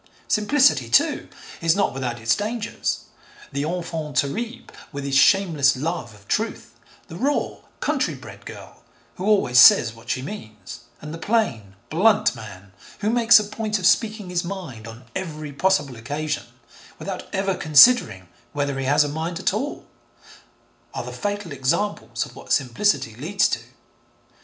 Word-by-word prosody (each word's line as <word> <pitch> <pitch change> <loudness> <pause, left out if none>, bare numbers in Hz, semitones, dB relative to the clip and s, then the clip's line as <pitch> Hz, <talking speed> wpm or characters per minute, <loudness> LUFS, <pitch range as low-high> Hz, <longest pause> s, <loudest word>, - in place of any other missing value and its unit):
Simplicity, 265 +5 +3
too, - - +2 0.3
is 165 -1 +3
not 200 - +1
without 125 -3 -4
its 115 0 +2
dangers. 215 +1 -3 0.5
The 140 +1 -2
enfant 165 -4 -4
terrible, 225 - -2 0.3
with 140 0 -6
his 140 -1 -2
shameless 155 -4 +4
love 145 -6 -4
of 100 -1 -20
truth, - - -2 0.3
the 165 - -9
raw 280 +6 -1 0.2
country - - 0
bred - - -12
girl - - -11 0.4
who 185 - -4
always 195 - +4
says 120 -2 +7
what 115 0 -15
she 130 - -1
means, 110 - -9 0.2
and 150 +1 -7
the 165 - -7
plain, 115 - -1 0.2
blunt 210 +5 +3
man 100 -3 -11 0.3
who 210 +1 +1
makes 235 -1 +6
a - - -2
point 215 +1 -3
of 185 - -4
speaking 215 -3 +1
his 175 0 0
mind 170 - -7
on 115 +2 -11
every 155 -5 -5
possible 170 -4 +1
occasion, 145 +7 -4 0.5
without - - -6
ever 195 0 0
considering 155 - +5 0.3
whether 140 -2 -2
he 135 - -2
has 145 +3 +4
a - - -2
mind 160 +3 -4
at 190 - 0
all, 270 +8 -4 1.1
are - - -3
the - - -7
fatal 205 -4 -4
examples 135 - -1
of - - -15
what - - -11
simplicity 130 - +1
leads 190 - +1
to. - - -1
160 Hz, 155 wpm, -23 LUFS, 130-205 Hz, 1.1 s, says